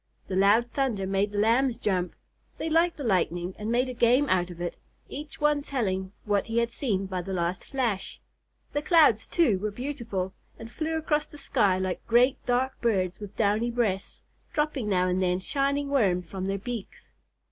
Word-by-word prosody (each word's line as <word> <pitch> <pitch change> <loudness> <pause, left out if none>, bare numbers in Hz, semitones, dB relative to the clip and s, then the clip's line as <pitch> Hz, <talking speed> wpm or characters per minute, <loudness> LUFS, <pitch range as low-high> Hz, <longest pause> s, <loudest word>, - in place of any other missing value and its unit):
The 190 - -2
loud 210 +5 +4
thunder 245 -9 0
made 195 +2 0
the 205 - -5
Lambs 235 +4 +3
jump. 180 -3 -1 0.4
They 325 - -3
liked 335 +2 +3
the 290 - -5
lightning 180 -4 0
and 210 +2 -3
made 250 +2 +2
a 255 - -4
game 245 +4 +3
out 180 -1 +2
of 175 -1 -10
it, 175 0 -3 0.3
each 295 +2 -8
one 295 -1 +2
telling 190 -9 -2
what 205 -2 +1
he 225 0 -2
had 235 0 +2
seen 205 -8 -1
by 185 -1 -3
the 190 +2 -5
last 175 0 -1
flash. 235 -8 -2 0.5
The 290 - 0
clouds, 300 - +4
too, 240 - +2
were 215 +2 -1
beautiful, 225 -6 -4 0.2
and 225 +1 -10
flew 320 +4 -2
across 305 -1 0
the 295 - -13
sky 210 -9 +2
like 185 -1 -2
great 245 +3 +3
dark 250 +2 0
birds 185 -6 0
with 205 -1 -9
downy 215 +2 +2
breasts, 225 -5 -2 0.3
dropping 295 -7 -1
now 185 -2 +2
and 185 +1 0
then 180 -1 +2
shining 280 +7 0
worms 195 -10 +2
from 190 -1 -5
their 195 +1 -1
beaks. 230 0 -7
225 Hz, 190 wpm, -27 LUFS, 190-270 Hz, 0.5 s, loud